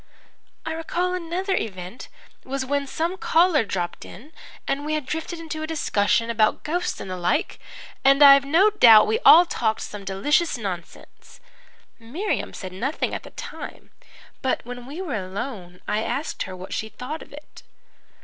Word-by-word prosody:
"I 320 Hz, -, -2 dB
recall 345 Hz, +3 st, -2 dB
another 365 Hz, +2 st, -2 dB
event 185 Hz, -, -5 dB, 0.4 s
was 265 Hz, 0 st, -3 dB
when 280 Hz, +1 st, -1 dB
some 335 Hz, +6 st, -2 dB
caller 335 Hz, -6 st, +3 dB
dropped 180 Hz, -4 st, -4 dB
in 265 Hz, +11 st, -13 dB, 0.4 s
and 280 Hz, +1 st, -1 dB
we 305 Hz, +1 st, -1 dB
had 305 Hz, -3 st, -3 dB
drifted 320 Hz, +4 st, -4 dB
into 315 Hz, -1 st, -6 dB
a 315 Hz, -, -3 dB
discussion 230 Hz, -7 st, +1 dB
about 220 Hz, -2 st, +1 dB
ghosts 350 Hz, +4 st, -2 dB
and 190 Hz, -, -7 dB
the 185 Hz, -, -4 dB
like 180 Hz, -, -1 dB, 0.4 s
and 275 Hz, +2 st, +6 dB
I've 275 Hz, -1 st, +9 dB
no 335 Hz, +10 st, +4 dB
doubt 225 Hz, -, +8 dB
we 445 Hz, -, 0 dB
all 350 Hz, -7 st, +8 dB
talked 220 Hz, -9 st, -1 dB
some 205 Hz, -1 st, -7 dB
delicious 275 Hz, -, +1 dB
nonsense. 185 Hz, -6 st, -8 dB, 0.6 s
Miriam 290 Hz, -, -3 dB
said 185 Hz, -2 st, -8 dB
nothing 265 Hz, +11 st, -2 dB
at -, -, -3 dB
the -, -, -12 dB
time, -, -, -9 dB, 0.5 s
but 260 Hz, -, -1 dB
when 245 Hz, 0 st, -8 dB
we 315 Hz, +7 st, -6 dB
were 315 Hz, -8 st, -4 dB
alone 190 Hz, -2 st, -6 dB
I 210 Hz, -, 0 dB
asked 260 Hz, +7 st, -3 dB
her 185 Hz, -, -7 dB
what 185 Hz, +1 st, -8 dB
she 220 Hz, -, -3 dB
thought 250 Hz, +9 st, -7 dB
of -, -, -13 dB
it. 295 Hz, +1 st, -13 dB
275 Hz, 170 wpm, -23 LUFS, 210-320 Hz, 0.6 s, I've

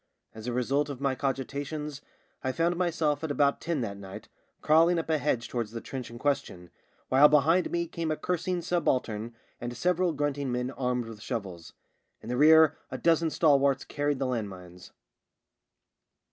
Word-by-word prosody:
As 110 Hz, +1 st, -9 dB
a -, -, -1 dB
result 135 Hz, +4 st, 0 dB
of 140 Hz, -3 st, -6 dB
my 140 Hz, -1 st, 0 dB
cogi 135 Hz, 0 st, -2 dB
tations 145 Hz, 0 st, -5 dB, 0.4 s
I 130 Hz, -, 0 dB
found 170 Hz, +5 st, +1 dB
myself 165 Hz, -4 st, 0 dB
at 160 Hz, -, -2 dB
about 140 Hz, 0 st, +2 dB
ten 165 Hz, -5 st, -1 dB
that 100 Hz, -4 st, -4 dB
night 95 Hz, -1 st, -10 dB, 0.3 s
crawling 165 Hz, +3 st, +5 dB
up 165 Hz, -1 st, -2 dB
a 155 Hz, -, +2 dB
hedge 125 Hz, -6 st, -1 dB
towards 120 Hz, -3 st, -3 dB
the 115 Hz, -, -4 dB
trench 130 Hz, +1 st, -7 dB
in 120 Hz, -, -10 dB
question, 115 Hz, -10 st, -2 dB, 0.4 s
while 140 Hz, +3 st, +7 dB
behind 155 Hz, +5 st, +3 dB
me 170 Hz, 0 st, -1 dB
came 165 Hz, -1 st, -4 dB
a 155 Hz, -, -1 dB
cursing 180 Hz, +1 st, -2 dB
subaltern 120 Hz, -10 st, -1 dB, 0.2 s
and 120 Hz, 0 st, -5 dB
several 180 Hz, +2 st, +1 dB
grunting 145 Hz, -2 st, -2 dB
men 125 Hz, +1 st, -2 dB
armed 125 Hz, -2 st, -2 dB
with 110 Hz, -2 st, -10 dB
shovels. 95 Hz, -10 st, -6 dB, 0.5 s
In 115 Hz, -, -10 dB
the 125 Hz, -, -1 dB
rear 160 Hz, +2 st, +6 dB
a -, -, -5 dB
dozen 165 Hz, -1 st, +2 dB
stalwarts 140 Hz, -4 st, +3 dB
carried 145 Hz, -1 st, -1 dB
the 135 Hz, -, -1 dB
land 120 Hz, -5 st, -2 dB
mines. 90 Hz, -1 st, -12 dB
140 Hz, 175 wpm, -28 LUFS, 120-160 Hz, 0.5 s, while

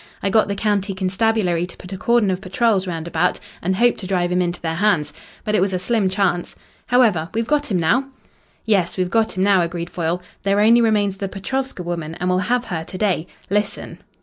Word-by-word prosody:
I 195 Hz, -, +1 dB
got 220 Hz, +2 st, +4 dB
the 200 Hz, -, -2 dB
county 200 Hz, -1 st, 0 dB
constabulary 190 Hz, -2 st, +1 dB
to -, -, -12 dB
put 180 Hz, +2 st, -9 dB
a -, -, -4 dB
cordon 235 Hz, -2 st, +2 dB
of 185 Hz, 0 st, -3 dB
patrols 195 Hz, 0 st, +1 dB
round 165 Hz, -2 st, -4 dB
about, 170 Hz, -, 0 dB, 0.2 s
and 185 Hz, +2 st, 0 dB
hoped 240 Hz, +4 st, +3 dB
to 190 Hz, -, -5 dB
drive 180 Hz, -2 st, 0 dB
him 180 Hz, 0 st, +2 dB
into 175 Hz, 0 st, -2 dB
their 160 Hz, -1 st, -2 dB
hands. 175 Hz, -4 st, +1 dB, 0.3 s
But 210 Hz, -, -2 dB
it 210 Hz, -, +3 dB
was 190 Hz, 0 st, +1 dB
a -, -, +1 dB
slim 195 Hz, +1 st, +1 dB
chance. 185 Hz, -2 st, 0 dB, 0.3 s
However, 215 Hz, -10 st, +3 dB
we've 230 Hz, 0 st, 0 dB
got 295 Hz, +2 st, 0 dB
him 190 Hz, -4 st, +1 dB
now." 235 Hz, +12 st, +2 dB, 0.6 s
"Yes, 195 Hz, -6 st, +1 dB
we've 185 Hz, -1 st, -1 dB
got 225 Hz, -4 st, +1 dB
him 185 Hz, -, +2 dB
now," 195 Hz, -2 st, +4 dB
agreed 170 Hz, 0 st, -3 dB
Foyle. 170 Hz, 0 st, -1 dB, 0.2 s
"There 200 Hz, +1 st, +1 dB
only 230 Hz, +3 st, +6 dB
remains 205 Hz, -4 st, +2 dB
the 195 Hz, -, -3 dB
Petrovska 260 Hz, +2 st, -4 dB
woman, 165 Hz, -2 st, -4 dB
and 180 Hz, +1 st, -1 dB
we'll 180 Hz, 0 st, +2 dB
have 245 Hz, 0 st, +1 dB
her 170 Hz, -5 st, -3 dB
to 185 Hz, -, -8 dB
day. 185 Hz, -5 st, 0 dB, 0.2 s
Listen." 205 Hz, 0 st, -2 dB
190 Hz, 220 wpm, -21 LUFS, 180-215 Hz, 0.6 s, only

